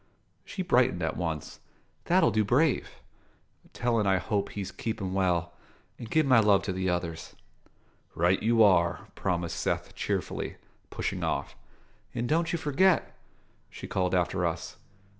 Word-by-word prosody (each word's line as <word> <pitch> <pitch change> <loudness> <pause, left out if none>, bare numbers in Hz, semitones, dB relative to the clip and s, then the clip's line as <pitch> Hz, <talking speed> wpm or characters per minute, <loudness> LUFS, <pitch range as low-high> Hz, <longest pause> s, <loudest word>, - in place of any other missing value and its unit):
She 190 - -5
brightened 125 - +2
at 80 - -1
once. 80 -4 -4 0.5
"That'll 180 -8 +4
do 110 +1 +2
brave. 130 +8 +2 0.8
Tell 120 -2 0
'en 105 - +1
I 95 -1 +4
hope 100 +2 -1
he's 95 -2 -5
keepin' 100 -4 -4
well, 90 -3 0 0.5
and 115 - -8
give 155 -1 +3
my 130 -4 +6
love 105 -3 +4
to 100 - -2
the 95 0 -1
others." 85 -2 -3 0.8
"Right 90 +3 +2
you 115 0 +4
are," 85 -4 +3
promised 85 -3 -2
Seth - - -2
cheerfully, - - -3 0.3
pushing - - -3
off. - - -2 0.6
"And 120 - -1
don't 165 +4 +1
you 170 - 0
forget!" 165 +4 +2 0.6
she - - -9
called 90 -1 0
after 90 +1 0
us. 85 0 -3
100 Hz, 145 wpm, -28 LUFS, 90-120 Hz, 0.8 s, my